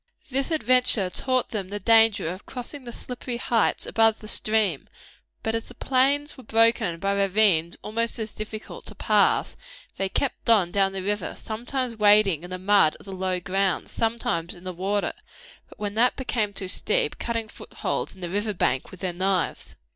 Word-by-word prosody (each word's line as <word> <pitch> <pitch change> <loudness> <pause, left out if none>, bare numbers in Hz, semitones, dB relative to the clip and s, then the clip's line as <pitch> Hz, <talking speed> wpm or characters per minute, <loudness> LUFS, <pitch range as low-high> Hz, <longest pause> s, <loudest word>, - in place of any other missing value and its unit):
This 270 +1 0
adventure 250 - +3
taught 255 +3 0
them 195 -4 -4
the 205 +1 -4
danger 225 -3 +4
of 185 +4 -6
crossing 255 +2 -7
the 240 - -6
slippery 245 0 -6
heights 235 -2 +1
above 225 -1 +3
the 215 - -11
stream, 215 - +1 0.5
but 225 - -1
as 225 0 -2
the - - -13
plains 280 +3 +1
were 260 - -13
broken 225 -6 +2
by 195 +3 0
ravines 195 -4 +2
almost 230 +2 -1
as 220 -2 -4
difficult 215 0 -7
to - - -9
pass, - - +2 0.4
they 195 0 -1
kept 255 +3 -2
on 200 -7 +4
down 195 0 +2
the 190 -1 -4
river, 205 +1 -2
sometimes 245 +2 -3
wading 205 -6 +5
in 175 - -8
the 185 - -4
mud 190 -4 +3
of - - -16
the 195 - -8
low 185 -1 -1
grounds, 195 +1 -1
sometimes 225 -7 -1
in 175 - -14
the 185 -1 -5
water, 195 +3 -1 0.6
but - - -16
when 205 -1 -3
that 240 +4 +3
became 225 -5 -1
too 195 -1 -4 0.2
deep, 460 +1 0
cutting 230 -1 -2
footholds - - -5
in 190 - -16
the 175 - -4
river 205 +1 -1
bank 130 -6 0
with 185 - -13
their 185 -2 -2
knives. 185 +1 -1
210 Hz, 185 wpm, -25 LUFS, 190-230 Hz, 0.6 s, wading